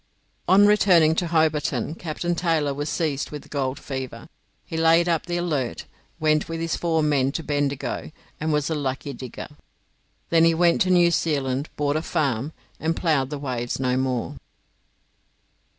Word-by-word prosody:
On 200 Hz, +2 st, +6 dB
returning 185 Hz, -6 st, +5 dB
to 175 Hz, +2 st, -1 dB
Hobarton 155 Hz, -2 st, +1 dB
Captain 170 Hz, +1 st, -3 dB
Taylor 160 Hz, -4 st, 0 dB
was 145 Hz, +2 st, -3 dB
seized 150 Hz, -5 st, -1 dB
with 150 Hz, -1 st, -7 dB
the -, -, -18 dB
gold 135 Hz, -2 st, -2 dB
fever. 130 Hz, 0 st, -6 dB, 0.4 s
He 165 Hz, -, -7 dB
laid 165 Hz, +1 st, +4 dB
up 170 Hz, 0 st, 0 dB
the 175 Hz, 0 st, -1 dB
'Alert', 150 Hz, -8 st, -2 dB, 0.3 s
went 155 Hz, 0 st, +1 dB
with 165 Hz, 0 st, -4 dB
his 165 Hz, -1 st, -1 dB
four 160 Hz, -2 st, 0 dB
men 140 Hz, -3 st, +2 dB
to 165 Hz, -, -3 dB
Bendigo, 145 Hz, -1 st, -2 dB, 0.3 s
and 155 Hz, +1 st, -1 dB
was 150 Hz, -1 st, +1 dB
a -, -, +2 dB
lucky 140 Hz, -1 st, -3 dB
digger. 125 Hz, -1 st, -8 dB, 0.8 s
Then 165 Hz, -1 st, +5 dB
he 165 Hz, 0 st, +4 dB
went 170 Hz, +4 st, +3 dB
to 185 Hz, -, +3 dB
New 175 Hz, -1 st, +5 dB
Zealand, 140 Hz, -4 st, -1 dB
bought 145 Hz, 0 st, 0 dB
a -, -, -1 dB
farm, 145 Hz, -5 st, -1 dB, 0.3 s
and 160 Hz, +1 st, 0 dB
ploughed 150 Hz, -7 st, +1 dB
the 150 Hz, -, -4 dB
waves 125 Hz, -4 st, -3 dB
no 125 Hz, -1 st, +1 dB
more. 130 Hz, -2 st, -2 dB
155 Hz, 165 wpm, -24 LUFS, 140-165 Hz, 0.8 s, On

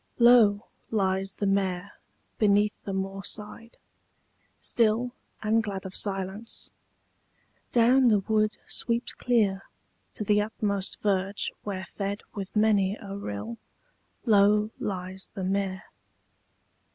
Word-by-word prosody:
LOW 235 Hz, -3 st, +6 dB, 0.2 s
lies 195 Hz, -2 st, 0 dB
the 205 Hz, -, -2 dB
mere 195 Hz, -1 st, 0 dB, 0.5 s
beneath 210 Hz, 0 st, +2 dB
the 200 Hz, -, -3 dB
moorside, 195 Hz, +4 st, -4 dB, 0.8 s
still 235 Hz, +2 st, +1 dB, 0.3 s
And 220 Hz, +1 st, +3 dB
glad 195 Hz, -3 st, -5 dB
of 190 Hz, -, -7 dB
silence: 195 Hz, +2 st, -2 dB, 1.0 s
down 250 Hz, +2 st, +5 dB
the 210 Hz, -4 st, +4 dB
wood 215 Hz, +1 st, +1 dB
sweeps 235 Hz, 0 st, 0 dB
clear 210 Hz, -6 st, +1 dB, 0.5 s
To -, -, -2 dB
the 210 Hz, 0 st, +3 dB
utmost 205 Hz, -2 st, -2 dB
verge 195 Hz, -1 st, 0 dB
where 190 Hz, -2 st, -4 dB
fed 200 Hz, +2 st, -4 dB
with 195 Hz, -1 st, -6 dB
many 210 Hz, -2 st, +3 dB
a 200 Hz, -2 st, -7 dB
rill 110 Hz, -, -5 dB, 0.7 s
Low 210 Hz, 0 st, +4 dB
lies 190 Hz, -1 st, -4 dB
the 195 Hz, -, -4 dB
mere. 190 Hz, 0 st, -1 dB
200 Hz, 110 wpm, -27 LUFS, 195-215 Hz, 1.0 s, LOW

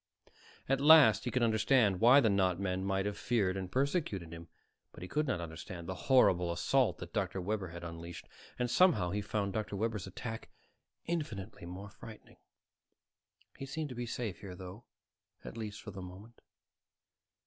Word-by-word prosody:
At 135 Hz, 0 st, +1 dB
least 145 Hz, -10 st, +7 dB
he -, -, 0 dB
could 125 Hz, 0 st, 0 dB
understand 110 Hz, -3 st, +3 dB
why 125 Hz, +5 st, +7 dB
the 115 Hz, -, +3 dB
not 95 Hz, -2 st, +2 dB
men 95 Hz, -1 st, -2 dB
might 95 Hz, 0 st, 0 dB
have 105 Hz, 0 st, -3 dB
feared 100 Hz, -6 st, +1 dB
and 95 Hz, -2 st, -5 dB
persecuted 130 Hz, -, -1 dB
him, 85 Hz, 0 st, -9 dB, 0.5 s
but -, -, -10 dB
he -, -, -6 dB
could 150 Hz, +8 st, -1 dB
not 125 Hz, -, 0 dB
understand 85 Hz, +1 st, -7 dB
the 95 Hz, -, -3 dB, 0.2 s
horrible 90 Hz, -10 st, +5 dB
assault 125 Hz, +9 st, +1 dB
that -, -, -9 dB
Dr. 95 Hz, -3 st, -1 dB
Webber 100 Hz, +1 st, -2 dB
had 85 Hz, 0 st, -9 dB
unleashed. 85 Hz, -2 st, -8 dB, 0.3 s
And 125 Hz, -, 0 dB
somehow 120 Hz, -, +3 dB
he 105 Hz, +2 st, -1 dB
found 100 Hz, -1 st, -2 dB
Dr. 110 Hz, -2 st, -3 dB
Webber's 105 Hz, -2 st, -2 dB
attack 110 Hz, +4 st, -7 dB, 0.6 s
infinitely 110 Hz, -, -4 dB
more 95 Hz, +3 st, -8 dB
frightening. 110 Hz, +1 st, -13 dB, 1.2 s
He 135 Hz, -, -6 dB
seemed 150 Hz, +2 st, -4 dB
to 125 Hz, -, -7 dB
be 120 Hz, 0 st, -4 dB
safe 115 Hz, -6 st, -4 dB
here, 95 Hz, -3 st, -8 dB
though, 95 Hz, +5 st, -10 dB, 0.6 s
at -, -, -8 dB
least 105 Hz, -2 st, -6 dB
for 105 Hz, -, -7 dB
the 95 Hz, -1 st, -8 dB
moment. 95 Hz, +6 st, -12 dB
105 Hz, 170 wpm, -33 LUFS, 90-120 Hz, 1.2 s, least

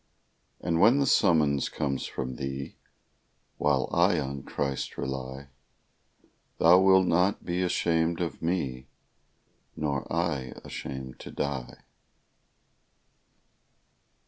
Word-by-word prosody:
And 85 Hz, -1 st, 0 dB
when 115 Hz, +7 st, +6 dB
the 140 Hz, -, +2 dB
summons 75 Hz, -, +3 dB
comes 70 Hz, -2 st, -2 dB
from 65 Hz, -1 st, -5 dB
Thee, 70 Hz, 0 st, -5 dB, 0.8 s
While 75 Hz, -3 st, +2 dB
I 85 Hz, 0 st, +4 dB
on 70 Hz, -1 st, -4 dB
Christ 70 Hz, 0 st, -3 dB
rely, 65 Hz, +1 st, -5 dB, 1.1 s
Thou 85 Hz, +2 st, +7 dB
wilt 95 Hz, -1 st, +6 dB
not 90 Hz, +4 st, +1 dB
be 90 Hz, +1 st, -1 dB
ashamed 85 Hz, -2 st, +1 dB
of 85 Hz, -2 st, -3 dB
me, 70 Hz, -7 st, -2 dB, 0.9 s
Nor 70 Hz, -3 st, -3 dB
I 80 Hz, -6 st, -1 dB
ashamed 65 Hz, -1 st, -7 dB
to -, -, -9 dB
die. 65 Hz, -3 st, -4 dB
75 Hz, 100 wpm, -28 LUFS, 65-85 Hz, 1.1 s, Thou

